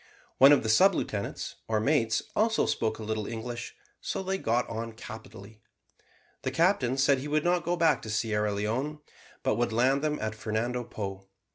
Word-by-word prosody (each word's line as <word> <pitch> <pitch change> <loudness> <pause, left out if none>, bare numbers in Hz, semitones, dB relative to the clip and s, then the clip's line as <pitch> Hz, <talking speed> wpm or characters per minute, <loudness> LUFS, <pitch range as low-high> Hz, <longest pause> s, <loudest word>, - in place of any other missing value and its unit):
One 135 +2 +9
of 145 - +5
the 110 - -1
sub 185 - +5
lieutenants, 100 -8 -4
or 110 -1 +1
mates, 115 -2 +2
also 220 +1 +2
spoke 110 -1 -1
a 110 - -7
little 110 -1 -2
English, 120 +1 -6 0.3
so - - -3
they 190 +1 -2
got 120 -3 +1
on 115 0 -5
capitally. 110 -1 -11 0.8
The - - -1
captain 165 -8 +2
said 140 0 +3
he 140 - -5
would 150 +1 +1
not 175 0 +2
go 175 - 0
back 165 -3 +3
to 110 - -8
Sierra 105 -1 0
Leone, 115 +9 -2 0.5
but - - +1
would 120 0 0
land 130 +5 +2
them 150 0 0
at 110 0 -2
Fernando 110 +3 -2
Po. 95 -3 -6
120 Hz, 180 wpm, -28 LUFS, 110-150 Hz, 0.8 s, One